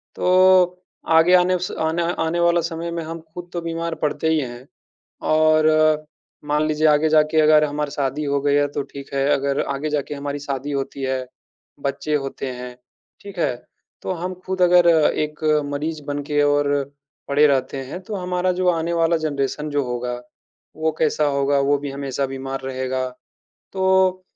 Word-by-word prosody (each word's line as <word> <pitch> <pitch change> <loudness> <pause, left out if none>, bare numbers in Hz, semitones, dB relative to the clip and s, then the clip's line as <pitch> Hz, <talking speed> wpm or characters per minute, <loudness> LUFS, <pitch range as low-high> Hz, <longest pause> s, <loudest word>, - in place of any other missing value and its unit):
तो, 185 0 +4 0.3
आगे 165 +2 +5
आने 180 0 +3
स 180 - -3
आने 160 +2 0 0.2
आने 165 +2 -1
वाला 170 0 +3
समय 165 0 -4
में 170 0 -3
हम 165 +1 -6
खुद 175 0 -8
तो 175 - -3
बीमार 165 0 -3
पड़ते 150 +1 0
ही 160 -1 +2
हैं, 125 -2 -6 0.6
और 155 0 +3 0.4
मान 150 +1 +1
लीजिए 155 0 +2
आगे 150 +1 +4
जाके 155 0 +4
अगर 155 0 +5
हमारी 150 0 -2
शादी 140 +1 -2
हो 140 -1 0
गया 145 0 +2
है 145 - +1
तो 145 - -2
ठीक 140 0 -11
है, 135 0 +1
अगर 140 0 0
आगे 150 +3 -3
जाके 150 -1 -2
हमारी 140 0 -4
शादी 140 0 -4
होती 140 0 -4
है, 130 -1 -1 0.5
बच्चे 140 +2 -2
होते 135 -1 -3
हैं, 125 0 -8 0.5
ठीक 200 -1 -11
है? 125 - +1 0.5
तो - - -3
हम 180 +2 -4
खुद 190 0 -3
अगर 175 -1 +5 0.3
एक 150 0 -3 0.3
मरीज़ 155 +2 -3
बन 145 0 -2
के 145 0 0
और 145 0 +2 0.5
पड़े 145 +2 +4
रहते 135 -1 0
हैं, 140 +7 -7
तो 205 +3 -6
हमारा 180 -1 -1
जो 185 - +1
आने 170 0 0
वाला 165 0 +2
जनरेशन 150 -1 -2
जो 145 -1 0
होगा, 125 0 -3 0.6
वो 160 0 0
कैसा 155 -1 +2
होगा? 140 0 +1
वो 140 +1 +2
भी 140 -1 -5
हमेशा 140 0 -3
बीमार 135 0 -5
रहेगा। 130 0 -2 0.7
तो 190 -1 +2
150 Hz, 175 wpm, -21 LUFS, 140-170 Hz, 0.7 s, आगे